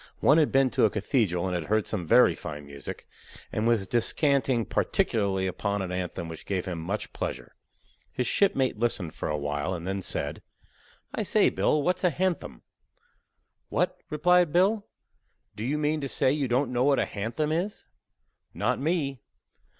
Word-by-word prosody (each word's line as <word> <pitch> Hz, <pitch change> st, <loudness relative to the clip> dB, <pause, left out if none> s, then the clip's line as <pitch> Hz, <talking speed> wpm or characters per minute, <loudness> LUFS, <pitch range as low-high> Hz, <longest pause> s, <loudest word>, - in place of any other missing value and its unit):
One 150 Hz, +3 st, +5 dB
had 155 Hz, -, +3 dB
been 135 Hz, -1 st, +3 dB
to -, -, +3 dB
a -, -, +4 dB
cathedral 100 Hz, -4 st, 0 dB
and 95 Hz, -, -2 dB
had 85 Hz, -3 st, -2 dB
heard 110 Hz, +2 st, +1 dB
some 90 Hz, -6 st, -3 dB
very -, -, +6 dB
fine 75 Hz, 0 st, -7 dB
music, 70 Hz, -1 st, -8 dB, 0.5 s
and 110 Hz, +1 st, 0 dB
was 115 Hz, -4 st, +2 dB
descanting 130 Hz, 0 st, +2 dB
particularly 100 Hz, -4 st, 0 dB
upon 100 Hz, +2 st, -2 dB
an 90 Hz, -, -5 dB
anthem 90 Hz, -2 st, -4 dB
which 80 Hz, -1 st, -9 dB
gave 95 Hz, -2 st, -1 dB
him 90 Hz, -3 st, -4 dB
much 95 Hz, +6 st, -4 dB
pleasure. 60 Hz, -2 st, -5 dB, 0.6 s
His 125 Hz, -, -2 dB
shipmate 135 Hz, -, +2 dB
listened 105 Hz, -8 st, -1 dB
for -, -, -4 dB
awhile, 75 Hz, +4 st, -2 dB
and 85 Hz, -1 st, -7 dB
then 95 Hz, +1 st, -2 dB
said: -, -, -2 dB, 0.7 s
"I -, -, -2 dB
say, -, -, +3 dB
Bill, 150 Hz, -1 st, +1 dB
what's 180 Hz, +2 st, 0 dB
a 180 Hz, -, +5 dB
hanthem?" 180 Hz, +2 st, -2 dB, 1.1 s
"What," -, -, 0 dB
replied 175 Hz, +2 st, +3 dB
Bill, 200 Hz, +5 st, +2 dB, 0.7 s
"do 105 Hz, -, -5 dB
you 140 Hz, +5 st, 0 dB
mean 150 Hz, +1 st, 0 dB
to 140 Hz, -, -3 dB
say 130 Hz, -, +2 dB
you 140 Hz, -2 st, 0 dB
don't 125 Hz, +1 st, 0 dB
know 125 Hz, 0 st, +2 dB
what 140 Hz, 0 st, +4 dB
a -, -, +2 dB
hanthem 115 Hz, +9 st, -3 dB
is?" 180 Hz, +6 st, -2 dB, 0.7 s
"Not 125 Hz, +5 st, 0 dB
me." 140 Hz, -4 st, -1 dB
120 Hz, 170 wpm, -27 LUFS, 95-150 Hz, 1.1 s, very